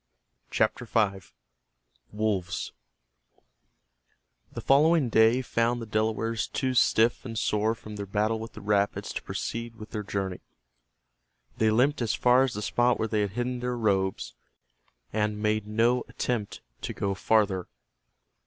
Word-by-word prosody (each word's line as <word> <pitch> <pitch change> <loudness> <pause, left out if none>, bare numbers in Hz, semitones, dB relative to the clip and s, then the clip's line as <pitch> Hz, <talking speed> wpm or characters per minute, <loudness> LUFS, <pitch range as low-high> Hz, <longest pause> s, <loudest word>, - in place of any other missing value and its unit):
CHAPTER 125 - 0
V—WOLVES 90 - -3 1.8
The - - -6
following 150 0 +4
day 115 +3 +4
found 120 0 0
the 115 - -5
Delawares 110 +1 -1
too 130 -1 -1
stiff 115 -1 +3
and 115 -3 -6
sore 110 +2 +1
from 105 -1 -10
their 100 -1 -5
battle 105 +3 0
with 115 +1 -8
the 110 - -10
rapids 100 0 0
to - - -4
proceed 115 0 -5
with 110 -1 -11
their 110 - -3
journey. 95 -3 -3 1.2
They 110 - +4
limped 125 +6 +2
as 115 -2 0
far 125 +1 +4
as 135 -5 0
the 105 - -4
spot 120 +3 +2
where 110 - -1
they 110 -1 0
had 100 -2 -2
hidden 125 +2 -2
their 125 0 -2
robes, 95 - 0 0.8
and 105 0 0
made 105 0 0
no 115 +3 +2
attempt 115 -5 -3 0.2
to - - -4
go 100 -1 -1
farther. 95 -2 +1
110 Hz, 140 wpm, -27 LUFS, 100-120 Hz, 1.8 s, following